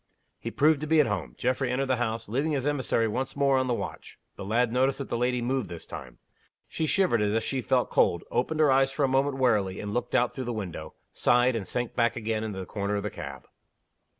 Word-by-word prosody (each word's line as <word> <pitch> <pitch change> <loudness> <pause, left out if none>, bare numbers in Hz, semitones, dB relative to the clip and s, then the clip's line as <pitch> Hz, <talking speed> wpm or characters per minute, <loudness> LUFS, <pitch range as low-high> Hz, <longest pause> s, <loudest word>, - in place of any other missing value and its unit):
He - - -4
proved 150 0 +3
to 155 - -3
be 160 +1 +4
at 150 - +6
home. 90 - -3
Geoffrey 130 +1 0
entered 130 +2 0
the 130 -1 +1
house, 115 -1 -2
leaving 140 +8 0
his 135 -2 -1
emissary 130 -5 +1
once 125 +4 -3
more 140 -1 +3
on 130 - 0
the 125 - +1
watch. - - -7 0.2
The - - -7
lad 115 +4 +1
noticed 130 +2 +2
that 140 - -6
the - - -1
lady 125 0 0
moved 130 -5 -1
this 85 -2 -8
time. 60 -2 -9 0.5
She 160 - -2
shivered 175 - +2
as 105 +1 +1
if 115 - +1
she 130 +2 -2
felt - - +1
cold 85 - +3
opened 155 +6 0
her 150 -3 +5
eyes 135 0 +4
for 140 +2 -1
a - - +4
moment 135 +1 +1
wearily, 105 -7 +1
and 105 0 -4
looked 120 - -2
out 120 - +2
through 130 -3 -5
the 120 - -2
window 90 -7 -6 0.2
sighed, 125 +1 +3
and 105 -4 -3
sank 120 -1 -2
back 120 -1 +1
again 110 -1 -2
in 110 - -3
the 95 -2 -5
corner 100 0 -2
of 100 - -2
the 105 - -3
cab. - - -8
125 Hz, 245 wpm, -27 LUFS, 110-135 Hz, 0.5 s, at